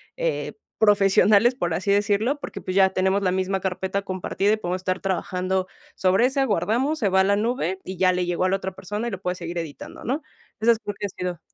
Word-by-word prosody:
eh, - - -2 0.3
profesionales, 205 +2 +5
por 175 -9 -1
así 190 +4 0
decirlo, 210 +7 +1
porque, - - -6
pues, 185 - -5
ya 190 -1 +6
tenemos 190 +1 +1
la 185 - +2
misma 190 0 -1
carpeta 190 +1 -2
compartida 195 +1 -1
y - - +1
podemos 180 -3 -3
estar 185 0 -1
trabajando 185 0 -1 0.3
sobre 190 +5 +3
ese, 270 +2 +1
guardamos, 250 - 0
se 215 - +1
va 190 0 +4
a - - +4
la 200 +1 +2
nube, 215 -4 -1
y 185 -1 -6
ya 185 0 +4
le 180 0 0
llegó 175 0 -1
a 185 - +3
la 195 - +2
otra 190 -1 -5
persona 205 +4 -4
y 235 - -3
lo 195 0 -6
puede 180 -1 -2
seguir 170 0 -6
editando, 155 -4 -8
¿no? 280 +6 -1 0.4
Esas 230 0 +3
creo 205 - -3
que 205 - -2
han 200 - -3
sido 180 -2 -4
190 Hz, 230 wpm, -24 LUFS, 185-210 Hz, 0.4 s, ya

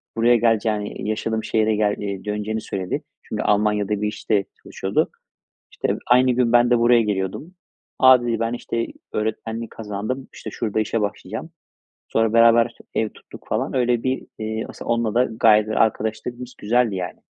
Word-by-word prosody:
buraya 120 +1 +4
geleceğini, 110 -3 0
yaşadığım 110 +1 -1
şehre 110 -1 +1
gel 105 -1 +1
eee, 100 -1 -5
döneceğini 105 +1 -2
söyledi. 95 -2 -4 0.2
Çünkü - - -4
Almanya'da 105 0 +1
bir 105 - +1
işte 105 -1 0 0.2
çalışıyordu. - - -1 0.6
İşte - - -1
aynı 125 +1 +5
gün 120 -1 +2
ben 120 0 +5
de 120 -1 +4
buraya 120 0 +5
geliyordum. 105 - -3 0.4
A, 130 -1 +7
dedi, 115 -2 -1
ben 115 +1 -1
işte 115 -1 -3 0.3
öğretmenlik 110 +1 -3
kazandım. 110 +5 -5
İşte - - -8
şurada 110 -2 -2
işe 110 +1 0
başlayacağım. 105 - -4 0.6
Sonra 115 -1 +1
beraber 115 0 +6
işte - - -19
ev 110 - +1
tuttuk - - -15
falan - - -1
öyle 120 -2 +1
bir, 130 0 -2
eee, 110 0 -3
asıl - - -10
onunla 115 -2 0
da 125 +2 +4
gayet 110 -2 +4
de 110 - -2
arkadaşlığımız 115 +3 -1
güzeldi, 115 0 +1
yani. 90 -1 -5
110 Hz, 165 wpm, -22 LUFS, 105-120 Hz, 0.6 s, A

